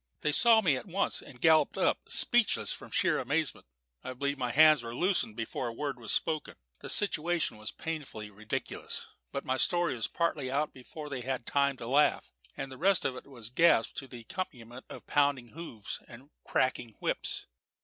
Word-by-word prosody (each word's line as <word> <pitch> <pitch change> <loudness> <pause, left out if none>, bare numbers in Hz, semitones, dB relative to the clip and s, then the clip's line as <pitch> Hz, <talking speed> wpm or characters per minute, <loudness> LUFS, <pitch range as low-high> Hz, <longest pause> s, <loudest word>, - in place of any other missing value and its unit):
They 150 - +1
saw 225 +7 +6
me 160 -9 +3
at 130 - -6
once, 190 +2 -1
and 125 - -13
galloped 155 0 +4
up, - - +2
speechless 240 -3 +2
from - - -10
sheer - - +2
amazement. - - -1 0.4
I 130 - -5
believe 140 +3 -1
my 125 -3 -2
hands 155 +1 +7
were 115 0 -6
loosened 175 - 0
before 115 +2 -3
a 115 - -4
word 140 0 -4
was 115 - -5
spoken. 155 -3 0 0.2
The - - -7
situation 175 - +2
was 110 0 -5
painfully 145 -10 -6
ridiculous; 105 +2 -5 0.3
but - - -4
my 130 0 0
story 175 +1 +2
was 115 -3 -2
partly 155 -6 -1
out 145 +3 0
before 150 +4 -9
they 135 -3 -4
had 125 -1 -3
time 140 -1 +1
to 120 - -7
laugh, 140 +5 +2 0.2
and 135 - -5
the 130 - -9
rest 190 +1 +4
of 130 - 0
it - - -10
was 120 -4 -8
gasped 125 -5 +4
to 135 - -9
the 120 -2 -9
accompaniment 120 -3 -6
of - - -9
pounding 140 -4 +1
hoofs 130 - -6
and 130 +5 -13
cracking 125 -3 0
whips. - - -2
135 Hz, 190 wpm, -31 LUFS, 120-155 Hz, 0.4 s, hands